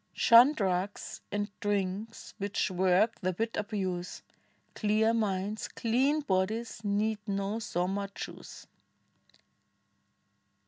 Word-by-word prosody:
Shun 245 +4 +7
drugs 195 -4 -2
and 205 0 -1
drinks 205 +2 -3
which 200 -1 -1
work 185 +5 +2
the 185 -1 -1
wit 225 +1 -1
abuse: 190 -4 -3 0.5
Clear 215 +1 +2
minds, 210 -1 -1
clean 265 +7 +1
bodies, 215 +1 -1
need 210 +1 0
no 200 +2 -1
Soma 195 0 -2
juice. - - -8
205 Hz, 95 wpm, -30 LUFS, 190-225 Hz, 0.5 s, Shun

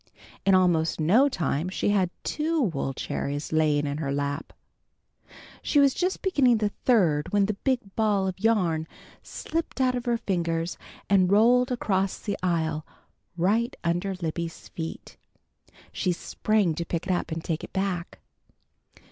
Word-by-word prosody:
In 195 - +6
almost 170 -4 +2
no 215 - +4
time 160 - -1
she 190 - -1
had 195 -3 +2
two 320 +2 -1
wool 165 - 0
cherries 145 +3 -4
lying 150 -2 +2
in 145 +1 -3
her 140 -3 -2
lap. 145 +1 -3 1.1
She 295 - +2
was 280 -2 +5
just 370 +1 -1
beginning 270 -11 +3
the 210 -1 0
third 170 - +3
when 205 -1 +3
the 215 - -1
big 215 -2 -2
ball 210 -3 +2
of 185 0 -4
yarn 180 -8 +1 0.3
slipped 330 -3 -4
out 255 -1 +3
of 245 -1 -3
her 240 -1 +1
fingers, 170 -4 -1 0.3
and 190 -2 +3
rolled 245 +5 +4
across 195 -5 0
the 205 -2 -3
aisle 160 -4 0 0.5
right 220 +8 +1
under 175 +3 -1
Libby's 170 -1 -5
feet. 165 -1 -7 0.7
She 180 - 0
sprang 205 0 0
to 170 - -3
pick 170 +1 -3
it 185 - +1
up 175 - -2
and 160 0 -4
take 160 -2 -3
it - - -8
back. 190 -3 -2
185 Hz, 155 wpm, -26 LUFS, 165-220 Hz, 1.1 s, In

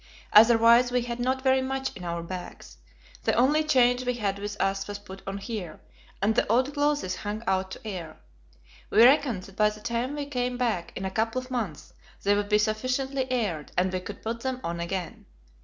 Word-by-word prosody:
Otherwise, 230 +2 +7
we 250 -1 +1
had 240 0 -5
not 260 +2 0
very 265 0 +4
much 265 0 -3
in 185 - -9
our 170 -1 -3
bags. 170 - -8 0.5
The - - +2
only 290 +6 +4
change 250 -4 +3
we 250 -1 -1
had 200 -4 -2
with 205 0 -5
us 195 0 0
was 205 -1 -5
put 195 -1 -11
on 195 0 -3
here, 200 -6 -6 0.4
and 215 +2 +3
the 230 - +1
old 255 +6 +2
clothes 290 -10 0
hung 210 +2 -5
out 190 -1 0
to 220 - -9
air. 170 -6 -6 0.7
We 225 - +6
reckoned 255 -7 +4
that 195 0 -13
by 210 0 +4
the 210 0 -10
time 235 +5 -2
we 290 -1 -3
came 250 -3 -2
back, 230 -9 -1
in 190 - -4
a 190 - -2
couple 225 +4 0
of 255 0 -10
months, 215 - -4 0.3
they 200 - +4
would 205 0 -1
be 210 - +5
sufficiently 255 +5 -1
aired, 200 - -2
and 185 +1 +1
we 185 - 0
could 195 +3 -9
put 230 +1 -3
them 260 0 -2
on 170 0 -3
again. 175 +1 -5
220 Hz, 205 wpm, -27 LUFS, 195-255 Hz, 0.7 s, Otherwise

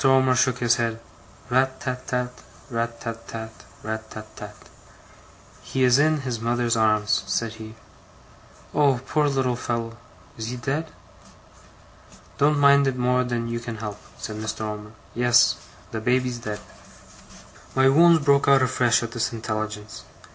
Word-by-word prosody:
Omer 130 -1 +4
shook 125 0 +2
his 120 -1 +2
head. 115 -1 -1 0.5
'RAT 130 +1 +2
tat 125 -1 -5
tat, 125 -1 -1 0.4
RAT 115 0 -2
tat 115 -1 -7
tat, 110 -1 -6 0.3
RAT 110 0 -5
tat 110 0 -10
tat.' 105 0 -9 1.1
'He 130 - -1
is 125 +1 +5
in 155 0 +3
his 125 -4 -3
mother's 120 0 +1
arms,' 110 -1 +2
said 115 -1 -1
he. 110 0 -10 1.0
'Oh, 140 -4 +3
poor 150 +1 +1
little 135 -3 0
fellow! 115 -1 -3 0.4
Is 110 - -4
he 125 +2 -4
dead?' 145 +6 -2 1.5
'Don't 145 +1 +4
mind 140 -1 +5
it 130 -1 -1
more 125 0 +2
than 120 -2 -2
you 115 0 -3
can 115 -1 -6
help,' 105 -2 -6 0.2
said 110 - -6
Mr. 110 0 -4
Omer. 105 0 -5 0.2
'Yes. 120 0 +4 0.3
The 110 - -4
baby's 125 +1 0
dead.' 105 -3 -5 1.1
My 130 0 +5
wounds 160 +2 +5
broke 140 -1 +4
out 135 -1 +6
afresh 125 -2 +2
at 115 - -5
this 115 -1 -1
intelligence. 110 -1 -5
120 Hz, 150 wpm, -24 LUFS, 110-130 Hz, 1.5 s, out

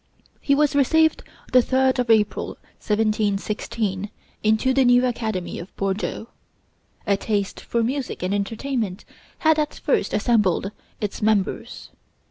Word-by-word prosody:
He 280 - +2
was 295 0 +2
received 315 +3 +3 0.3
the 255 - +7
3d 260 +1 +2
of 245 -2 0
April, 215 -2 +2 0.2
1716, 210 -1 -1 0.3
into 220 +4 +2
the 270 0 +4
new 245 0 +5
academy 220 -7 -3
of 170 - -10
Bordeaux. 195 +3 -3 0.8
A 200 - +3
taste 200 -1 -2
for 235 -1 -1
music 260 -4 -3
and 185 +2 0
entertainment 215 0 -2 0.3
had 315 -1 +3
at 300 -1 -1
first 265 - 0
assembled 210 -4 +2 0.3
its 205 -2 -4
members. 210 -2 -1
220 Hz, 125 wpm, -23 LUFS, 205-260 Hz, 0.8 s, the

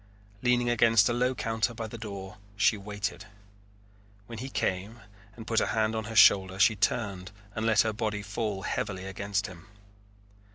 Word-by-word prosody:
Leaning 125 -1 +2
against 115 -3 +4
a - - +1
low 125 +2 +1
counter 115 +1 -1
by 115 - -4
the 110 - -8
door 100 -2 -8 0.2
she 105 +2 +3
waited. 100 0 -5 1.0
When 115 +1 -8
he 130 +3 -5
came 105 0 -2 0.3
and 115 - -10
put 115 0 +1
a - - 0
hand 110 +1 0
on 110 -1 -3
her 115 +1 -7
shoulder 95 -2 +6
she 105 +3 +4
turned 100 -2 -1 0.2
and 110 +1 -2
let 110 -3 +5
her 110 -1 0
body 105 -1 -3
fall 100 -1 -3
heavily 95 -2 -3
against 100 +1 -2
him. 95 +2 -11
105 Hz, 170 wpm, -28 LUFS, 100-115 Hz, 1.0 s, shoulder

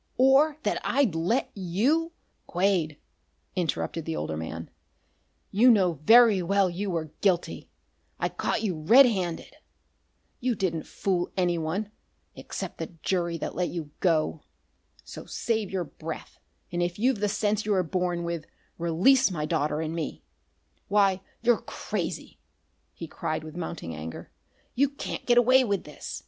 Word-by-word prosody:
or 275 +4 +5
that - - 0
I'd 260 - +2
let 175 +11 0
you 235 - 0 0.2
" - - -45
"Quade," 175 -5 +1 0.6
interrupted 170 -2 -2
the 160 - -3
older 80 - -3
man, 80 +1 -6 0.8
"you 230 +6 +5
know 185 - +3
very 225 -3 +7
well 195 +1 +2
you 195 +4 -3
were 160 -4 -3
guilty. 185 -4 0 0.5
I - - +1
caught 225 - -2
you 200 -4 0
red 240 - +8
handed. 185 -8 -2 0.8
You 245 -2 0
didn't 170 -5 -2
fool 180 -3 -1
anyone 175 +3 0 0.4
except - - -7
the - - -3 0.2
jury 170 -3 0
that - - -4
let 180 -1 -1
you 160 -4 -6
go. 160 -3 +1 0.6
So - - -9
save 220 -4 -1
your 190 -2 -1
breath, 160 +1 -8 0.3
and, 175 0 -1
if 175 0 -1
you've 245 +1 +2
the 210 0 +1
sense 210 +1 0
you 215 - -2
were 185 -2 +2
born 175 0 -1
with, 170 -2 -4 0.3
release 190 +11 +4
my 155 -5 -2
daughter 155 -1 0
and 160 0 -3
me. 165 -3 -4 0.6
Why, 195 -2 +3 0.2
you're 240 -1 +3
crazy!" - - -5 0.5
he 165 - -8
cried 155 0 -3
with 155 0 -9
mounting 165 - -5
anger. 80 +1 -8 0.4
"You 275 +2 +3
can't 280 - -6
get 240 -1 +4
away 255 +2 +6
with 200 -5 -1
this! 150 - -7
180 Hz, 150 wpm, -27 LUFS, 165-215 Hz, 0.8 s, red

